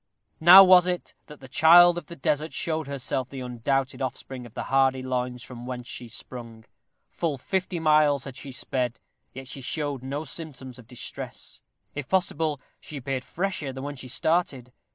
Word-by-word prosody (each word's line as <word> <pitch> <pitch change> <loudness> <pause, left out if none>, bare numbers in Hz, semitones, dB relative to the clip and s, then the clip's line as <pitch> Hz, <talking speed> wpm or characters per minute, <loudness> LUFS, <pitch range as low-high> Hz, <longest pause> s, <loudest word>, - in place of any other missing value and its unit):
Now 180 +4 +10
was 185 -1 +7
it 180 -1 -3
that 150 -2 -13
the 130 - -11
child 170 +5 +7
of 175 - -6
the 170 - -9
desert 150 +2 -1
showed 160 -3 -1
herself 130 -2 -3
the 135 -2 -7
undoubted 130 +3 -2
offspring 130 -1 -5
of 115 - -20
the - - -3
hardy 135 -1 +2
loins 125 -1 -3
from 120 -1 -9
whence 125 -1 -6
she 120 - -5
sprung. 115 -1 -9 0.5
Full 160 -5 -2
fifty 185 +5 -2
miles 150 -3 +3
had 135 -2 -8
she 135 +1 -7
sped, 125 -1 -3 0.3
yet 135 0 -9
she 135 +1 -8
showed 145 0 -2
no 140 +4 -4
symptoms 130 -4 -7
of 115 - -15
distress. 125 -1 -8 0.3
If 145 -2 -6
possible, 160 -5 0 0.2
she 150 - -9
appeared 135 -1 -3
fresher 175 -5 -3
than 130 0 -7
when 145 0 -5
she 130 -1 -7
started. 135 -3 0
135 Hz, 175 wpm, -26 LUFS, 125-155 Hz, 0.5 s, Now